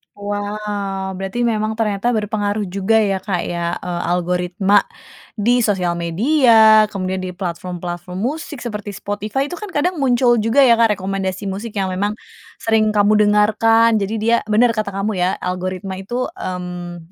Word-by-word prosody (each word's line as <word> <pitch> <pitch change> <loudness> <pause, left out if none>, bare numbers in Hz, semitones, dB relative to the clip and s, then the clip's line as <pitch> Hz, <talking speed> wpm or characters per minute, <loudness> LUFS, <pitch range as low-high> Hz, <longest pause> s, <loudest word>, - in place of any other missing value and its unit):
Wow. 205 -1 -4
Berarti 195 +6 -3
memang 220 -1 0
ternyata 215 +1 0
berpengaruh 210 -1 -1
juga 195 +4 0
ya, 195 -3 +1
Kak, 185 -4 -2
ya, 170 0 -2
eee, 175 -1 -4
algoritma 180 +3 +1 0.6
di 240 +4 +2
sosial 190 -5 +1
media, 220 - +5
kemudian 190 -2 -3
di 185 - -4
platform-platform 180 -1 -5
musik 290 +8 -3
seperti 210 -3 -5
Spotify. 210 +8 -3
Itu 290 - -7
kan 420 - -7
kadang 350 0 -1
muncul 245 -2 +3
juga 225 +6 +4
ya, 235 - +6
Kak, 225 -3 +3
rekomendasi 190 0 -3
musik 205 +3 -5
yang 190 -1 -1
memang 205 +3 -2 0.4
sering 220 -1 +2
kamu 210 0 +3 0.2
dengarkan. 220 +2 +4
Jadi 200 +2 -2
dia 230 +2 +2
benar 230 +2 +4
kata 215 -2 -2
kamu 195 +2 -2
ya, 180 - +3
algoritma 185 +1 -4
itu, 240 +6 -3
mmm, 180 -2 -6
205 Hz, 150 wpm, -19 LUFS, 185-225 Hz, 0.6 s, ya